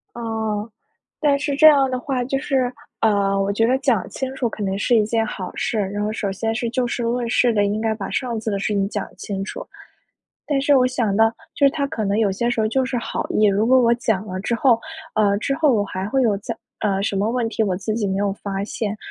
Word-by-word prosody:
哦。 220 -2 -3 0.5
但 285 -2 +3
是 285 0 -1
这 310 - +7
样 275 -3 +4
的 255 - -1
话 255 -2 -2
就 270 +2 -1
是， 260 -2 0 0.3
呃， 200 -2 +2
我 195 +1 0
觉 225 +3 +1
得 255 +2 +2
讲 255 -8 +1
清 265 0 -4
楚 255 -3 -1
可 215 - -6
能 195 -1 -1
是 240 +4 +3
一 215 - +4
件 225 0 +1
好 190 -3 -6
事。 225 - -1
然 205 0 -2
后 210 +1 -1
首 205 -2 -2
先 225 +3 -2
是 235 +1 -2
就 245 +1 0
事 240 - -3
论 235 +1 -1
事 245 0 +3
的， 205 -2 +2
应 205 +2 -1
该 220 0 0
把 205 -3 -6
上 240 -4 -2
次 220 - -3
的 200 - -1
事 195 - -1
情 195 -1 +1
讲 - - -3
清 195 -1 -4
楚。 - - -7 0.8
但 285 -2 +1
是 285 +1 +4
我 255 -1 +4
想 235 -6 0
到， 225 +1 +5 0.2
就 280 - +4
是 - - +4
他 285 -1 -1
可 220 -5 -3
能 200 +1 0
有 215 -3 +2
些 235 +5 -1
时 240 - -1
候 215 - +2
就 260 +4 +1
是 255 -1 -2
好 235 - -3
意， 215 - +3
如 205 +2 +2
果 260 +1 +6
我 235 -1 +4
讲 220 -4 -1
了 185 -2 -5
之 225 +5 -1
后， 235 -1 +3 0.4
呃 205 -2 +3
之 275 +6 -1
后 305 -1 +3
我 210 -3 +2
还 190 -1 -4
会 265 +1 +2
有 220 -4 +2
再， 220 +3 -5 0.2
呃 195 -2 0
什 200 - -1
么 200 +3 +1
问 240 -1 0
题， 225 - -2
我 190 -4 0
自 215 +3 -3
己 215 -2 -1
没 190 - -1
有 200 0 +1
发 195 -1 -3
现， 210 0 -3
225 Hz, 280 characters per minute, -21 LUFS, 205-250 Hz, 0.8 s, 这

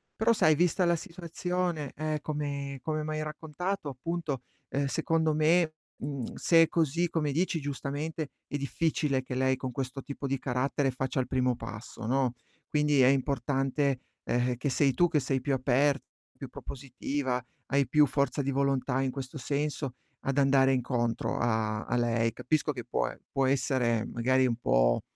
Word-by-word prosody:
Però 225 +2 +3
sai 155 -8 +4
vista 175 +2 +2
la 170 0 +4
situazione, 175 -3 -3
eh, 155 0 -1
come 140 -2 -3
come 155 -1 -2
m'hai 155 0 -2
raccontato 155 +3 -3
appunto, 140 -1 -3 0.3
uhm, 140 +1 0
secondo 160 +2 +1
me, 155 +1 +3 0.2
mhmm, 135 -3 -4
se 165 -1 +5
è - - +2
così, 170 +1 +1
come 150 -4 0
dici 170 0 +1
giustamente, 145 +2 -3 0.2
è - - -5
difficile 140 0 0
che 130 0 -6
lei 130 0 +2
con 130 -1 -4
questo 135 +1 -4
tipo 140 0 -5
di 135 -1 -1
carattere 135 +1 0
faccia 130 +1 -2
il 130 - 0
primo 125 -1 +1
passo, 110 +1 -8
no, 130 0 +1 0.3
quindi 150 -2 +3
è 125 - +7
importante, 135 0 +1 0.2
ehm, 125 +1 +1
che 130 +4 -2
sei 135 0 +3
tu 175 +6 +3
che 155 - +3
sei 130 -1 -1
più 140 - 0
aperta, 135 +2 +2 0.3
più 135 - -6
propositiva, 130 0 -3 0.2
hai 140 -1 +2
più 150 -1 +5
forza 140 0 0
di 140 +1 -1
volontà 135 -1 +1
in 130 -1 0
questo 135 +1 -6
senso 140 -1 -2 0.3
ad 135 +1 -2
andare 135 -1 +5
incontro 120 -2 0
a 110 -2 0
a - - -1
lei. 115 -1 +2
Capisco 155 +2 0
che 120 -4 -6
può - - 0
e - - -10
può 135 -1 +2
essere 125 -4 +1
magari 130 +2 +2
un 120 -2 +1
po' - - +3
140 Hz, 170 wpm, -29 LUFS, 130-155 Hz, 0.3 s, è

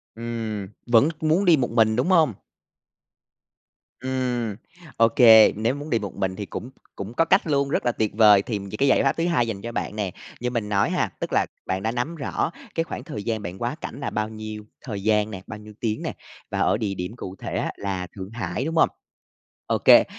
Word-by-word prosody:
Ừm, 110 -3 -4 0.2
vẫn 120 +6 +5
muốn 160 +5 +2
đi 170 -3 +6
một 125 -4 -1
mình, 110 -2 +3
đúng 125 +10 +1
hông? 160 -9 +4 1.7
Ừm, 125 -4 -1 0.4
ô 115 - +6
kê, 110 -3 +8
nếu 115 +5 0
muốn 145 +2 -7
đi 115 - +2
một 100 -2 -6
mình 95 -1 -1
thì 105 - -5
cũng 120 - -6 0.3
cũng 100 +3 -6
có 165 - +3
cách 185 0 +3
luôn, 140 -2 +1
rất 125 - 0
là 120 - +3
tuyệt 110 -2 -1
vời. 105 -2 +7
Thì 105 -1 -3 0.2
cái 140 - +3
giải 135 - +4
pháp 135 - +1
thứ 165 - +1
hai 120 -9 +2
dành 100 -3 -4
cho 120 - -5
bạn 105 - -3
nè, 100 -4 -2 0.3
như 125 0 -1
mình 115 -4 -2
nói 100 -1 +2
ha, - - 0
tức - - -4
là - - +3 0.2
bạn 95 +1 -2
đã 110 - 0
nắm 125 +8 -2
rõ 155 +1 -2 0.2
cái 165 - +1
khoảng - - -6
thời 105 - -6
gian 110 -1 -2
bạn 90 -1 -6
quá 120 +4 -2
cảnh - - -6
là 140 - -2
bao 110 0 -2
nhiêu 110 -1 -7 0.2
thời 100 -5 -5
gian 105 0 +2
nè, 95 -2 -6
bao 110 -1 -7
nhiêu 105 0 -12
tiếng 110 -2 -1
nè, - - -3 0.4
và - - -2
ở - - +3
địa 105 -3 -2
điểm 90 +4 -5
cụ 95 -6 -7
thể - - -4
á - - -1
là 95 -2 -3
Thượng 95 -1 -7
Hải, 110 +1 -3
đúng 165 +1 -2
hông? 165 - +5 0.8
Ô - - +1
kê, - - +7
115 Hz, 230 wpm, -24 LUFS, 105-130 Hz, 1.7 s, kê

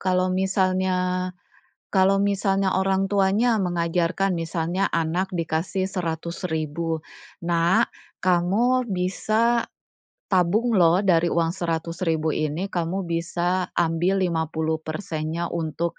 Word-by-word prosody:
Kalau 185 0 +1
misalnya 185 -1 +1 0.6
kalau 195 0 +4
misalnya 195 -1 +1
orang 195 0 +1
tuanya 205 +4 +3
mengajarkan, 175 +1 0
misalnya 165 +3 -1
anak 170 +3 0
dikasih 165 +3 -1
100.000, 165 -2 -3 0.4
"Nak, 170 +1 +2 0.3
kamu 210 +8 +2
bisa 215 +5 +1 0.6
tabung 195 +6 +2
loh 175 +2 +5
dari 175 -3 +4
uang 165 -1 +1
100.000 165 -2 -1
ini, 155 +5 -1
kamu 175 +2 -1
bisa 175 +2 -1
ambil 175 +3 +1
50%-nya 160 0 -2
untuk 165 0 -2
180 Hz, 95 wpm, -24 LUFS, 165-190 Hz, 0.6 s, loh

